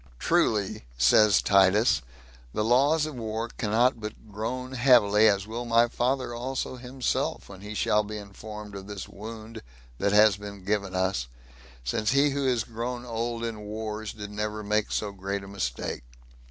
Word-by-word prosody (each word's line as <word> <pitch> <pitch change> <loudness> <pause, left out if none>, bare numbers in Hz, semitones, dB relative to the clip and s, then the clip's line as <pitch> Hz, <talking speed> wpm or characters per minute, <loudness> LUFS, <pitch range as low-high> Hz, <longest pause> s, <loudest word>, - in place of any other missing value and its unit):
"Truly," 100 - +1
says 95 - +5
Titus, 100 +4 +4 0.5
"the 105 - +1
laws 140 +7 +3
of 155 - -5
war 115 -1 -3
cannot 115 +3 +1
but 105 0 -8
groan 125 +5 -4
heavily, 115 -5 +5
as 100 -2 +2
will 115 +3 -5
my 115 0 +4
father 125 +1 -1
also 130 +2 -3
himself, 125 0 -2
when 95 -1 -11
he 105 +1 -7
shall 105 0 +3
be 105 +1 -6
informed 105 +1 -9
of 100 0 -8
this 100 -3 -6
wound 110 +2 -9 0.4
that 100 - +1
hath 105 -1 +5
been 100 -2 -9
given 100 -2 -1
us, 95 -8 0 0.6
since 105 - 0
he 140 +1 +4
who 140 -1 0
is 120 -4 +2
grown 120 +2 -5
old 115 0 -3
in 115 -2 -3
wars 110 0 -5
did 105 -1 -8
never 105 +1 -3
make 105 +1 0
so 105 -2 -1
great 100 0 -4
a - - -9
mistake. 90 -13 -3
110 Hz, 165 wpm, -27 LUFS, 100-120 Hz, 0.6 s, says